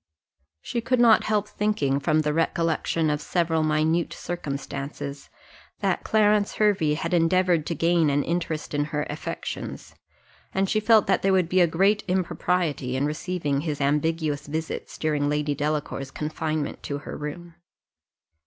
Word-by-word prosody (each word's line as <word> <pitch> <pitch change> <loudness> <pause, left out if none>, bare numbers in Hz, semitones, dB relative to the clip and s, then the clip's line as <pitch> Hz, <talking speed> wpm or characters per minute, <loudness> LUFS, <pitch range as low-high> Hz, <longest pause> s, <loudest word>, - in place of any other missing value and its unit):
She 235 - -2
could 255 +2 +1
not 230 -2 +6
help 210 -1 +1
thinking, 150 -12 0
from 155 +2 +2
the 150 -1 0
recollection 165 -1 0
of 150 0 -1
several 165 0 0
minute 155 +2 +1
circumstances, 140 -3 -5 0.5
that - - 0
Clarence 210 -1 +2
Hervey 200 -8 +2
had 165 +3 -3
endeavoured 175 -1 +3
to 170 - -2
gain 165 0 +3
an 145 0 +1
interest 165 -3 -3
in 145 0 +1
her 150 0 -2
affections, 150 - -6 0.6
and 195 0 +2
she 215 - +1
felt 215 -1 +5
that - - +2
there 195 0 +2
would 185 -3 +2
be 185 0 +4
great 195 +6 +2
impropriety 180 -7 0
in 135 +2 +1
receiving 150 -2 -2
his 150 -2 -3
ambiguous 150 +1 0
visits 160 +2 -4
during 150 -2 0
Lady 150 0 0
Delacour's 145 -2 -2
confinement 155 0 -3
to 140 - -4
her - - -6
room. 165 +4 -7
160 Hz, 145 wpm, -25 LUFS, 150-180 Hz, 0.6 s, not